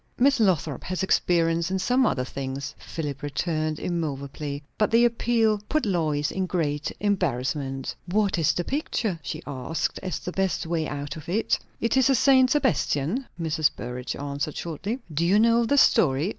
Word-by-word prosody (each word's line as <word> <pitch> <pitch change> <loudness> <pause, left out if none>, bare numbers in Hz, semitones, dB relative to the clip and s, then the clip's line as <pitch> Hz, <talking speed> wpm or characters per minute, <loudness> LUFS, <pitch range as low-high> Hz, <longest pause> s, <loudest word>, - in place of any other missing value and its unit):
"Miss 275 +2 +4
Lothrop 170 - +1
has 185 +1 -2
experience 170 -2 +2
in 190 - 0
some 250 +6 +2
other 130 -9 0
things," 135 +1 -5
Philip 145 -4 -5
returned 155 +2 -1
immoveably. 145 -3 -4
But 210 - +2
the 235 +1 +5
appeal 225 -2 +2
put 310 -3 +1
Lois 155 -7 0
in 190 -1 -2
great 150 -5 -1
embarrassment. 135 -8 -1
"What 200 0 +1
is 155 -2 +3
the 175 - -1
picture?" 225 - -2
she - - -6
asked, 140 +3 -3
as 185 -5 -3
the 180 - -6
best 190 -2 -1
way 165 -1 -1
out 145 +1 -5
of 155 +1 -10
it. 215 +6 +1 0.2
"It's 260 +3 +3
a 270 - +5
St. 260 0 +5
Sebastian," 250 - +1
Mrs. 160 -2 +2
Burrage 125 +1 -5
answered 145 +1 -4
shortly. 175 - -3 0.2
"Do 155 +3 0
you 185 +4 +4
know 230 +2 +4
the 285 - +2
story?" 150 - +4
170 Hz, 165 wpm, -25 LUFS, 145-215 Hz, 0.2 s, the